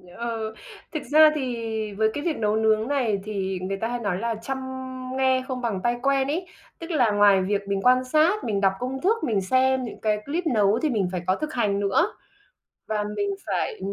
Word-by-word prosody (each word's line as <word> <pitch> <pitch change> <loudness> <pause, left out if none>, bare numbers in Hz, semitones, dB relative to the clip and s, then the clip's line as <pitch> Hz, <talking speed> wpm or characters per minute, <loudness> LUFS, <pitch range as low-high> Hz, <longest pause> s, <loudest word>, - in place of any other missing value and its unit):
Ừ, 225 -2 -4 0.4
thực 310 - -3
ra 310 0 +8
thì 245 -5 -3 0.3
với 220 +2 +2
cái 290 - -4
việc 330 -2 -1
nấu 210 -1 +1
nướng 220 +1 +2
này 245 -8 0
thì 195 -3 -3
người 195 +1 -3
ta 225 +3 -2
hay 245 0 -3
nói 200 -5 -2
là 230 +1 -1
"trăm 270 +3 -3 0.6
nghe 260 -1 +2
không 255 -2 -4
bằng 225 -6 -1
tay 240 0 +2
quen" 275 0 +2
ấy. 340 +6 -2 0.3
Tức 335 +1 -7
là 250 -9 +3
ngoài 205 -2 +5
việc 200 +2 0
mình 195 -1 -1
quan 255 +2 +4
sát, 315 +10 +2
mình 205 -3 -1
đọc 195 -1 +3
công 260 +2 -4
thức, 440 +4 +1
mình 210 -5 +1
xem 260 +5 +2
những 235 - -7
cái 215 -1 +1
clip 325 +5 -2
nấu 215 -4 +3
thì 310 - +1
mình 210 -8 0
phải 180 -2 -3
có 185 - +3
thực 305 +5 -5
hành 205 -5 +1
nữa. 325 - +1 0.7
Và 210 -1 -1
mình 405 - 0 0.2
phải 440 - -2
235 Hz, 215 wpm, -25 LUFS, 205-275 Hz, 0.7 s, ra